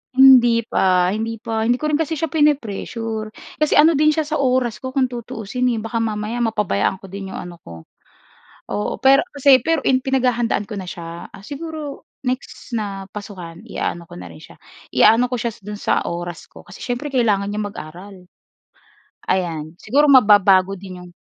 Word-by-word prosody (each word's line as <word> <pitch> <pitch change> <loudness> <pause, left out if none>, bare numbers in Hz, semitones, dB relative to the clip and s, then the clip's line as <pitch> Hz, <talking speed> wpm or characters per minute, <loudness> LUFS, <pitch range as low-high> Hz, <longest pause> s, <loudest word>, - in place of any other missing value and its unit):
Hindi 255 -3 +7
pa, 180 -1 +2
hindi 225 +1 -4
pa. 220 0 -2
Hindi 240 +2 +1
ko 305 - -1
rin 300 - +1
kasi 320 -1 -2
siya 325 - 0
pine-pressure 225 -7 -1 0.2
kasi 305 -1 +1
ano 320 +2 +6
din 305 +2 +4
siya 310 -1 -1
sa 310 - -2
oras 250 -3 0
ko 260 - -4
kung 265 -1 +1
tutuusin, 245 0 -3
eh, 230 - -1
baka 225 +1 -2
mamaya 220 +2 -2
mapabayaan 200 - 0
ko 195 - -12
din 195 0 -7
yung - - -6
ano 175 -1 -8
ko, 85 -1 -12 0.8
oo. 210 - -2
Pero 275 +5 +5
ano - - -33
kasi 275 -2 +6
pero 325 -3 +1
pinaghahandaan 255 -4 +1
ko 210 0 -6
na 185 - -6
siya, 170 -1 -8
ah, 195 - -14
siguro 300 +2 -7 0.2
next 255 +2 -4
na 205 -4 -4
pasukan 190 -2 -9
i-aano 170 -5 -4
ko - - -11
na 90 -1 -9
rin 80 - -14
siya - - -15 0.4
i-aano 240 +3 +5
ko 250 - -2
siya 235 0 -2
do'n 210 +1 -7
sa - - +1
oras 175 -1 -6
ko. - - -15
Kasi - - -14
siyempre 245 +4 -4
kailangan 210 -6 +1
niyang 210 0 -2
mag-aral, 180 +6 -10 1.2
ayan. 165 -4 -2
Siguro 285 +5 +3
mababago 195 -5 +5
din 185 -1 -10
yung 180 -1 -13
225 Hz, 180 wpm, -20 LUFS, 195-260 Hz, 1.2 s, Hindi